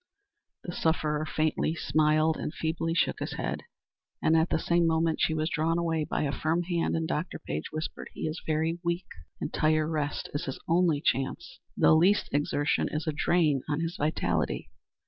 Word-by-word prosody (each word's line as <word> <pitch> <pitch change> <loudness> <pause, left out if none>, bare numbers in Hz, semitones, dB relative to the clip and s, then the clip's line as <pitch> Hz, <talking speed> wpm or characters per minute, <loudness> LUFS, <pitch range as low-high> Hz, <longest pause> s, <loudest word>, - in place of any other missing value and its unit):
The 175 - -5
sufferer 155 -2 0
faintly 155 +1 0
smiled 155 +1 +2
and - - -4
feebly 165 +1 -1
shook - - +1
his - - -3
head, - - -3 0.6
and 160 - +3
at 160 +1 +3
the - - +2
same 170 +1 +2
moment 160 0 +1
she 160 - +2
was 155 0 0
drawn 165 +1 +1
away 165 -2 0
by - - -1
a 140 - 0
firm 160 +6 0
hand, 170 -1 0
and 165 0 -1
Dr. 155 +4 -2
Page 75 +1 -5
whispered: 155 +1 -5
"He - - -8
is 155 +1 -3
very 160 +2 0
weak. 170 +1 -1 0.3
Entire 155 0 +1
rest 150 -3 -2
is 145 - -2
his 135 - -5
only 165 -3 +3
chance. 175 +7 -1 0.2
The - - +6
least 185 +6 +4
exertion 145 +1 +1
is 155 +1 -3
a 155 - 0
drain 150 -3 +2
on 145 0 0
his 165 +1 -2
vitality." 85 - -1
160 Hz, 180 wpm, -28 LUFS, 150-165 Hz, 0.6 s, The